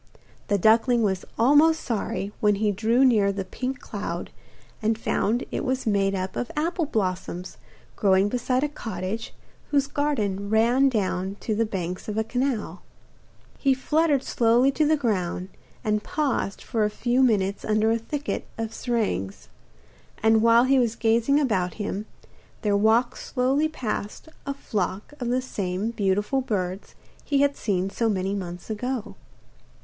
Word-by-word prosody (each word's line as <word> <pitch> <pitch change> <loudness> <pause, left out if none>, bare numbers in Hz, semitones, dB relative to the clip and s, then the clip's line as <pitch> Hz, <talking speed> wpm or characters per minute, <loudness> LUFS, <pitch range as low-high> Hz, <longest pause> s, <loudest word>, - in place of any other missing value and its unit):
The 205 - +2
duckling 225 +4 +4
was 190 -3 0
almost 295 +6 +5
sorry 205 -3 -3
when 210 -1 +3
he 210 +1 +1
drew 230 +6 +3
near 210 -6 +4
the 195 -1 -4
pink 255 +7 -4
cloud - - -5 0.5
and 220 0 +1
found 230 +1 0
it - - -2
was 260 -1 -1
made 200 -2 +2
up 185 0 -3
of 245 - -3
apple 330 +1 0
blossoms 185 - -3 0.4
growing 195 -1 +3
beside 250 +3 0
a - - +2
cottage 220 -5 -5 0.4
whose 280 -2 +2
garden 215 -10 -1
ran 240 +5 +4
down 195 -4 -1
to 220 - -1
the 225 +1 +1
banks 180 -3 -4
of 210 - -3
the 220 - +1
canal. 230 -7 -2 0.8
He 270 -2 +3
fluttered 300 +1 +1
slowly 240 +3 +3
to 300 +2 +1
the 310 0 +3
ground 185 -7 -1 0.3
and 210 0 +1
paused 280 -9 -1
for 225 -3 0
a 210 - +2
few 245 +4 0
minutes 200 -6 +2
under 215 +1 +2
a 230 - +1
thicket 290 +6 -4
of 225 -1 -4
syringas, 100 - -2 0.7
and 220 0 +5
while 230 +1 +6
he 265 +1 +4
was 235 -2 +1
gazing 235 +5 +2
about 190 - 0
him, 210 0 -4 0.6
there 205 -2 +2
walked 220 +4 +3
slowly 270 +4 +1
past 235 -2 -5 0.2
a 280 - -2
flock 205 -1 -3
of 245 - -3
the 250 +1 0
same 195 -2 -2
beautiful 205 +4 0
birds 190 -5 -3 0.3
he 280 -1 +1
had 285 0 +3
seen 195 -2 -1
so 230 +3 0
many 190 -1 -1
months 180 -3 -5
ago. 220 -1 -3
220 Hz, 155 wpm, -25 LUFS, 200-255 Hz, 0.8 s, while